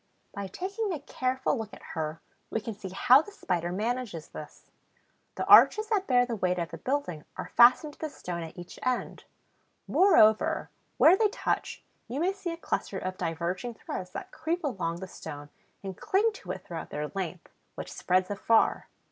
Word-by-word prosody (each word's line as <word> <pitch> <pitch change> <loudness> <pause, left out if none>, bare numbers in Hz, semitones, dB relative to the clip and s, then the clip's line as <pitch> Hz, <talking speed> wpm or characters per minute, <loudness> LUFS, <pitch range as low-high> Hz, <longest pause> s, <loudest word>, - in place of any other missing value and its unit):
By 200 -1 -5
taking 390 - -3
a 325 - -3
careful 260 -1 -1
look 220 -1 -6
at - - -16
her 155 0 -3 0.3
we - - -1
can 225 +1 -5
see 195 -2 -8
how 250 +8 +6
the 410 - -12
Spider 175 - -2
manages 215 -4 -3
this. 150 - -11 0.6
The - - -2
arches 430 0 +7
that 405 -4 +1
bear 245 -1 +4
the 240 -2 -3
weight 180 -3 0
of 170 -1 -3
the - - -7
building 255 - -2
are - - -6
fastened 250 +5 +6
to - - -21
the 315 - -3
stone 175 -10 -6
at 165 +1 -8
each 175 0 -10
end. 255 -1 -2 0.6
Moreover, 220 - +4 0.3
where 335 - +7
they 430 +2 +3
touch, - - -2 0.2
you 250 +5 -4
may 365 +4 +1
see 390 -3 -5
a 335 - -5
cluster 205 - -3
of 185 0 -4
diverging 180 +8 -3
threads 180 -4 -6
that - - -7
creep 330 +2 -2
along 180 - -2
the 190 - -5
stone 145 -4 -9 0.3
and 190 -1 -5
cling 420 - +2
to - - -12
it - - -6
throughout 165 -2 -6
their 150 0 -4
length, 185 -3 -5 0.2
which - - -7
spreads 185 +1 +1
afar. 225 +3 +2
220 Hz, 185 wpm, -29 LUFS, 180-300 Hz, 0.6 s, arches